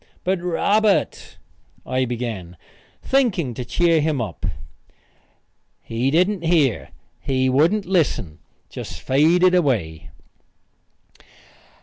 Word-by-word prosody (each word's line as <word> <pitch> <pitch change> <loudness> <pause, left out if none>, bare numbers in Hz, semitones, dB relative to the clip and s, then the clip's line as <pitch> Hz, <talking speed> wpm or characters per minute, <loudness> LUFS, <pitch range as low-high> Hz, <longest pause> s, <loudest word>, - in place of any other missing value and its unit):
"But 185 -1 -1
Robert 200 +4 0 0.2
" - - -35
I 130 0 0
began, 115 -8 -5 0.5
thinking 220 - +1
to 125 - -5
cheer 165 +6 +2
him 150 -2 0
up. 105 -8 -5 1.4
He 115 +4 -1
didn't 180 +5 +1
hear; 160 -8 +1 0.3
he 130 -1 0
wouldn't 165 +10 +2
listen 140 - -1 0.3
just - - -8
faded 170 +7 +3
away. 110 - 0
150 Hz, 95 wpm, -21 LUFS, 120-180 Hz, 1.4 s, faded